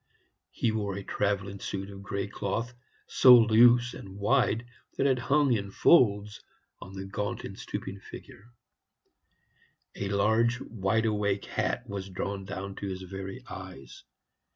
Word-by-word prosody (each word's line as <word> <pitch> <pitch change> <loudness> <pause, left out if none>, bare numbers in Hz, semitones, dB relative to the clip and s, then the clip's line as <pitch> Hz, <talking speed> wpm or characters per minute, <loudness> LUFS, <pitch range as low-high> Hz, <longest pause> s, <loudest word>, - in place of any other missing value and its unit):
He 115 - -1
wore 100 -3 -2
a 100 - -5
travelling 100 -1 -2
suit 95 +1 -5
of 100 0 -10
gray 100 0 -3
cloth, 105 +4 -3 0.3
so 125 -1 +7
loose 120 +2 +5
and 95 -1 -10
wide 110 +2 +1 0.3
that - - +1
it 130 -2 +3
hung 140 +2 +2
in 100 -3 -2
folds 105 -4 +3 0.4
on 95 - -11
the 95 0 -6
gaunt 100 +1 -4
and - - -7
stooping 100 +1 -6
figure; 100 +2 -13 1.5
a 100 - -3
large 110 +4 +2
wide 110 -1 -1
awake 105 -2 0
hat - - -2
was 100 -1 -5
drawn 95 +1 -4
down 100 0 -6
to 100 - -5
his 95 -1 -5
very 95 +1 -7
eyes. 65 -2 -10
100 Hz, 145 wpm, -28 LUFS, 95-115 Hz, 1.5 s, so